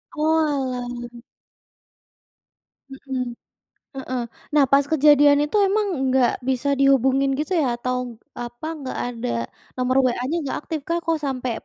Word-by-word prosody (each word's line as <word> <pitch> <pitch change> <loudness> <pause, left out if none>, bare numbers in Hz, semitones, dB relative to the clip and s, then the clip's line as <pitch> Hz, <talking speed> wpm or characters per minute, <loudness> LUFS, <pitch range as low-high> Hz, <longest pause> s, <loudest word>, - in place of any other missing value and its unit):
Oalah. 255 -6 -1 1.7
Mmm. 265 -1 -4 0.7
Heeh. 255 -2 -3 0.3
Nah 295 - +6
pas 280 0 +5
kejadian 290 -1 +6
itu 295 - -3
emang 415 +2 +1
enggak 260 -2 +3 0.2
bisa 265 +2 0
dihubungin 270 0 +3
gitu 305 +4 -3
ya 250 -4 +1
atau 250 +1 -2 0.5
apa 240 +4 -8
nggak 265 -2 -5
ada 235 - -4 0.5
nomor 255 +1 +1
WA-nya 250 +5 -1
enggak 285 -4 -3
aktif 320 - -3
kah? 335 - +1
Kok 325 -1 +1
sampai 255 -2 -2
270 Hz, 125 wpm, -23 LUFS, 250-295 Hz, 1.7 s, Nah